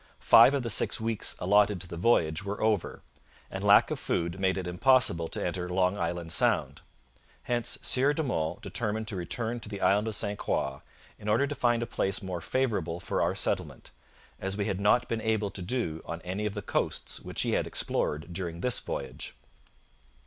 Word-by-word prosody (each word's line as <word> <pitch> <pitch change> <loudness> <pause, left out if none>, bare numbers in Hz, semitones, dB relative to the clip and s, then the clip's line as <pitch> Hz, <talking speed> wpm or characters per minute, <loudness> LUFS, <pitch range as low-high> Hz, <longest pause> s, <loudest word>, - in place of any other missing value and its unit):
Five 140 - +7
of 135 - -1
the 115 - -1
six - - +2
weeks 110 -1 -1
allotted 100 +1 +3
to 90 - -6
the 85 - -7
voyage 85 -4 +2
were 100 +1 -4
over, 110 -4 0 0.5
and - - -5
lack - - +6
of - - -2
food 85 +2 -2
made 95 0 +1
it 95 - -3
impossible 90 -3 +3
to - - -3
enter 90 0 -3
Long 90 +1 +1
Island 85 -2 -3
Sound. - - +2 0.6
Hence 120 -1 0
'Sieur 135 +3 +3
de 155 +2 -1
Monts 80 - -2
determined 110 -1 -3
to 100 - -4
return 115 +6 -3
to 110 - -7
the 100 -2 -6
Island 105 +3 +2
of 110 - -3
St 100 -1 -2
Croix 70 0 -2 0.4
in 105 - -9
order 115 +7 +3
to 145 - -4
find 120 -3 +1
a - - -2
place 95 -2 -1
more 90 -2 -4
favourable 100 -11 -1
for - - -2
our - - +1
settlement, - - -3 0.5
as 95 +1 -2
we 100 - -1
had 100 -2 -2
not 120 +4 +3
been 115 -1 -2
able 110 -2 0
to 95 - -7
do 90 -5 -2
on 85 - -6
any 95 +4 -2
of 105 - -5
the 105 - -5
coasts - - -1
which - - -1
he - - 0
had - - 0
explored 75 +3 -1
during 85 -2 -4
this 125 -1 +2
voyage.' 65 -1 -5
100 Hz, 200 wpm, -28 LUFS, 90-115 Hz, 0.6 s, Five